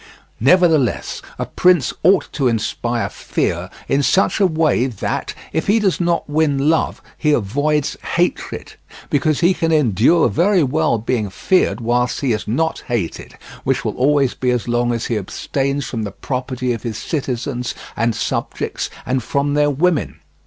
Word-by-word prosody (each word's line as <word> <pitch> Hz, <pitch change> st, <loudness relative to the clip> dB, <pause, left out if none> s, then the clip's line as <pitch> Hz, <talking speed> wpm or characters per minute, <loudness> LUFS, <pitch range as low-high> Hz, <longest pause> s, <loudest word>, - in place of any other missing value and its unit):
Nevertheless 155 Hz, -, +3 dB, 0.2 s
a -, -, -2 dB
prince 180 Hz, -7 st, +2 dB
ought 185 Hz, +3 st, +4 dB
to 135 Hz, -3 st, +1 dB
inspire 115 Hz, +1 st, -1 dB
fear -, -, -2 dB, 0.2 s
in 135 Hz, +1 st, +2 dB
such 190 Hz, +10 st, +2 dB
a 195 Hz, -, +5 dB
way 155 Hz, -6 st, +2 dB
that, 120 Hz, -7 st, -3 dB, 0.2 s
if 160 Hz, -, -1 dB
he 205 Hz, +3 st, +4 dB
does 195 Hz, -4 st, +1 dB
not 170 Hz, -1 st, 0 dB
win 150 Hz, -1 st, +1 dB
love, 160 Hz, -, -1 dB, 0.2 s
he 150 Hz, -1 st, +2 dB
avoids 145 Hz, +6 st, 0 dB, 0.2 s
hatred; -, -, -1 dB, 0.4 s
because 145 Hz, +1 st, +1 dB
he 175 Hz, +2 st, +4 dB
can 165 Hz, -2 st, -1 dB
endure 150 Hz, -, +4 dB
very 175 Hz, -, +3 dB
well 130 Hz, -3 st, +1 dB
being 110 Hz, -1 st, -1 dB
feared 180 Hz, -, +1 dB
whilst 125 Hz, +2 st, 0 dB
he 135 Hz, -5 st, +1 dB
is 105 Hz, -, -4 dB
not 160 Hz, +9 st, 0 dB
hated, 115 Hz, -10 st, -3 dB, 0.3 s
which -, -, 0 dB
will -, -, -2 dB
always 140 Hz, 0 st, +2 dB
be 125 Hz, -, -1 dB
as 125 Hz, -2 st, 0 dB
long 120 Hz, 0 st, +1 dB
as 115 Hz, -1 st, -2 dB
he 115 Hz, -3 st, -1 dB
abstains 135 Hz, +7 st, -2 dB
from 115 Hz, -, -4 dB
the 105 Hz, -, -3 dB
property 125 Hz, 0 st, -3 dB
of 115 Hz, -, -5 dB
his 115 Hz, -3 st, -4 dB
citizens 125 Hz, -4 st, -3 dB, 0.2 s
and 115 Hz, 0 st, 0 dB
subjects -, -, -3 dB, 0.2 s
and 130 Hz, +1 st, 0 dB
from 140 Hz, +4 st, -1 dB
their 145 Hz, 0 st, +3 dB
women. 155 Hz, +3 st, 0 dB
135 Hz, 160 wpm, -19 LUFS, 120-160 Hz, 0.4 s, a